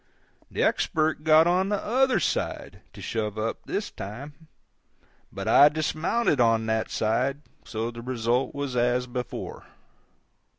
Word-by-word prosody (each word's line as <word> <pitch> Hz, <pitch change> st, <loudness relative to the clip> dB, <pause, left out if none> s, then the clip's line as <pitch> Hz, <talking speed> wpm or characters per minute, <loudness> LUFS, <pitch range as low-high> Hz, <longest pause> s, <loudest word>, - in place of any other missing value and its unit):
The -, -, -1 dB
Expert 155 Hz, -1 st, +1 dB
got 160 Hz, 0 st, +6 dB
on 185 Hz, +3 st, +2 dB
the 205 Hz, -, +1 dB
_other 255 Hz, +5 st, +2 dB
_side -, -, -2 dB
to -, -, -10 dB
shove 110 Hz, -2 st, -3 dB
up 110 Hz, +1 st, -2 dB
this -, -, -3 dB
time, 140 Hz, +10 st, -9 dB, 0.8 s
but -, -, -6 dB
I 145 Hz, -, +7 dB
dismounted 155 Hz, -, 0 dB
on 115 Hz, -1 st, +3 dB
that 110 Hz, 0 st, -1 dB
side; 130 Hz, +6 st, 0 dB, 0.2 s
so 115 Hz, +1 st, -3 dB
the 115 Hz, 0 st, -9 dB
result 120 Hz, +1 st, -1 dB
was 140 Hz, -3 st, -3 dB
as 125 Hz, +1 st, +1 dB
before. 125 Hz, -1 st, -6 dB
130 Hz, 135 wpm, -26 LUFS, 115-155 Hz, 0.8 s, I